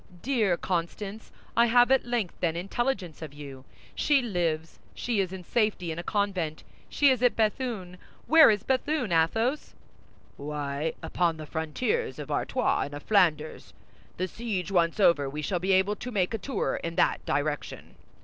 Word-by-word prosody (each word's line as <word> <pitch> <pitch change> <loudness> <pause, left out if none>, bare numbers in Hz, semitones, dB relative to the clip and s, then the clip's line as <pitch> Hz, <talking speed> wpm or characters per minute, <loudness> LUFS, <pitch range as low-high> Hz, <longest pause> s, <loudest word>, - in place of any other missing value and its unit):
"Dear 225 -9 +1
Constance! 195 +5 -4 0.2
I 235 +1 +5
have 245 +2 +5
at 265 -2 +3
length, 235 -7 -1
then, 165 -2 0
intelligence 190 - -2
of 150 -3 -8
you. 135 -3 -10 0.3
She 280 -3 +2
lives; 165 -7 -2 0.2
she 235 -4 -1
is 185 -2 0
in 190 -1 -7
safety 210 -4 0
in 160 - -5
a - - -5
convent; 185 -6 -2 0.3
she 285 -2 +4
is 255 -2 0
at 245 -1 +3
Béthune! 215 -5 -1 0.3
Where 320 0 +8
is 210 -2 +1
Béthune, 265 - 0
Athos?" 225 - +1 0.6
"Why, 145 +1 -3
upon 165 0 0
the 155 - -7
frontiers 250 - -2
of - - -7
Artois 270 +2 0
and 145 - -8
of 145 - -8
Flanders. 160 -7 +1 0.4
The 185 - -1
siege 200 -3 -4
once 170 0 +2
over, 150 -8 +4
we 150 +2 -5
shall 180 +3 -1
be 190 +2 +1
able 190 +2 +3
to 250 - -6
make 200 -4 0
a 225 - -2
tour 270 +6 -2
in 170 0 -4
that - - +2
direction." 145 0 -3
190 Hz, 170 wpm, -27 LUFS, 160-235 Hz, 0.6 s, Where